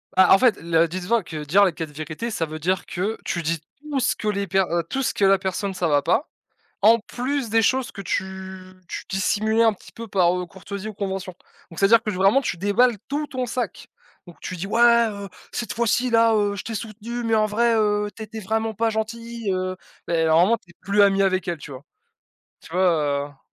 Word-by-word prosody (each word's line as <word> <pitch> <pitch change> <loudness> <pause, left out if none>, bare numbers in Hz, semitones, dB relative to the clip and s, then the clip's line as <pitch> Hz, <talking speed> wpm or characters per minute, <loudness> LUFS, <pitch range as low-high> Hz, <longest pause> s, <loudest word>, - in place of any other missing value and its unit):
Bah 185 -1 +6
en 190 - +9
fait 245 0 +3
le 165 0 +2
dis 185 +3 -5
toi 235 -2 +2
que 155 -2 -6
dire 190 +8 +4
les 185 - +1
4 160 -1 -5
vérités 155 +9 -5
ça 190 -7 -1
veut 155 0 -7
dire 185 +4 0
que 200 +5 -3
tu 170 - -2
dis 165 +1 -1 0.2
tout 295 -3 -2
ce 240 - +1
que 215 - -5
les 200 -1 0
per 190 +2 +2
heu, 170 0 0
tout 270 - -2
ce 260 - 0
que 200 - +2
la 195 0 +5
personne 190 +1 -2
ça 180 -2 -1
va 145 -2 +2
pas, 225 - +1 0.5
en 230 +2 +7
plus 250 +2 -3
des 225 +1 +3
choses 260 +2 +1
que 200 - -8
tu 190 0 -5
tu - - -6
dissimulais 215 +4 +1
un 225 -1 +4
petit 200 - -16
peu 230 0 -8
par, 180 -3 +2
heu, 180 - -4
courtoisie 200 +3 -8
ou 215 - -6
convention. 190 -2 -4 0.4
Donc 165 - -8
c'est-à-dire 220 +3 +5
que 215 - -2
vraiment 195 +7 +3
tu 215 - -3
déballes 210 +5 +2
tout 295 +2 -2
ton 255 -3 -4
sac. 245 +2 -4 0.4
Donc 175 - -14
tu 185 - -6
dis: 180 +3 -5
«Ouais, 235 +1 +5
heu, 200 -1 -7 0.2
cette 240 - -4
fois-ci, 235 +2 +1
là, 230 -1 +4
heu, 205 -1 +1
je 195 - -6
t'ai 225 - -5
soutenu 230 +2 -6
mais 225 - 0
en 215 -1 +3
vrai, 230 +2 +2
heu, 210 -1 +1
tu - - -11
étais 220 +1 -7
vraiment 220 +2 -2
pas 225 +2 +1
gentil, 230 0 -4
heu». 185 0 -2 0.3
Ben 165 -1 +1
normalement, 175 +8 +4
tu 175 - -28
es 170 - -16
plus 200 +2 +2
ami 195 -1 +4
avec 185 -2 0
elle, 170 -1 -2
tu 145 -1 -11
vois? 130 0 -9 0.8
Tu - - -16
vois? 150 -6 +1
Heu. 140 - -27
200 Hz, 230 wpm, -23 LUFS, 180-230 Hz, 0.8 s, en